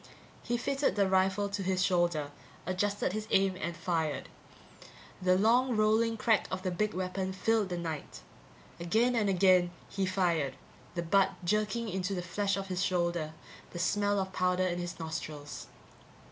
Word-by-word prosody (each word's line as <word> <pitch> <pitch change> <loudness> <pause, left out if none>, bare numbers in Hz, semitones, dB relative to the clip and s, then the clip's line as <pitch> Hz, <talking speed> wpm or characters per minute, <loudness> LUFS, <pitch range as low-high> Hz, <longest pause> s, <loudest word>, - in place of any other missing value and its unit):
He 240 - -1
fitted 275 -2 0
the 200 -2 +3
rifle 190 +2 +2
to 200 0 -3
his 185 0 +1
shoulder, 175 -5 +1 0.3
adjusted 195 +1 -1
his 215 0 -4
aim, 195 -1 +3
and 170 +1 -3
fired. 160 -4 -1 0.9
The 185 0 +4
long 240 +4 +3
rolling 220 +2 +3
crack 220 -1 +2
of 185 0 -4
the 185 - -1
big 210 +3 -1
weapon 185 +1 -2
filled 210 +1 +1
the 175 - -2
night. 160 -3 -5 0.6
Again 220 +9 +2
and 210 -3 +2
again 185 -1 +4 0.2
he 195 -1 -1
fired, 170 -8 +1 0.4
the 170 - -1
butt 195 +3 +3
jerking 215 +4 0
into 190 0 -2
the 180 - -3
flesh 200 +3 -1
of 195 - -3
his 185 -1 -2
shoulder, 170 -4 0 0.4
the - - -8
smell 205 +3 +1
of 190 -1 -3
powder 180 0 +1
in 175 -1 -1
his 175 0 -5
nostrils. 155 -2 -6
185 Hz, 160 wpm, -31 LUFS, 175-205 Hz, 0.9 s, The